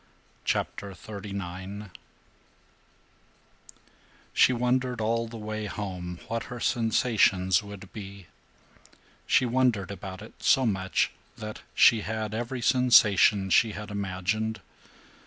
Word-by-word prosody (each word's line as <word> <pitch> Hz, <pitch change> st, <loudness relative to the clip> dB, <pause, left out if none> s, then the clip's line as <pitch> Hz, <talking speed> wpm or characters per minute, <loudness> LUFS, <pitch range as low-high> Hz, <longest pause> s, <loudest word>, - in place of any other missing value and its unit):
CHAPTER 100 Hz, -1 st, -2 dB
XXXIX 100 Hz, 0 st, -7 dB, 2.4 s
SHE 130 Hz, -, +5 dB
wondered 125 Hz, 0 st, 0 dB
all 115 Hz, +1 st, 0 dB
the 115 Hz, 0 st, -8 dB
way 110 Hz, 0 st, -4 dB
home 90 Hz, -4 st, -5 dB
what 115 Hz, +1 st, -3 dB
her 125 Hz, -, -7 dB
sensations 110 Hz, -6 st, +2 dB
would 100 Hz, -2 st, -11 dB
be. 100 Hz, -2 st, -9 dB, 1.0 s
She 130 Hz, -, +4 dB
wondered 120 Hz, -6 st, +1 dB
about 95 Hz, -1 st, -7 dB
it -, -, -12 dB
so 130 Hz, -, +3 dB
much 95 Hz, -4 st, 0 dB, 0.3 s
that 110 Hz, 0 st, -7 dB
she 115 Hz, -3 st, +6 dB
had 110 Hz, 0 st, -3 dB
every 120 Hz, +2 st, -3 dB
sensation 110 Hz, -6 st, +5 dB
she 110 Hz, +5 st, +4 dB
had 105 Hz, 0 st, -7 dB
imagined. 100 Hz, +3 st, -2 dB
105 Hz, 105 wpm, -27 LUFS, 100-115 Hz, 2.4 s, she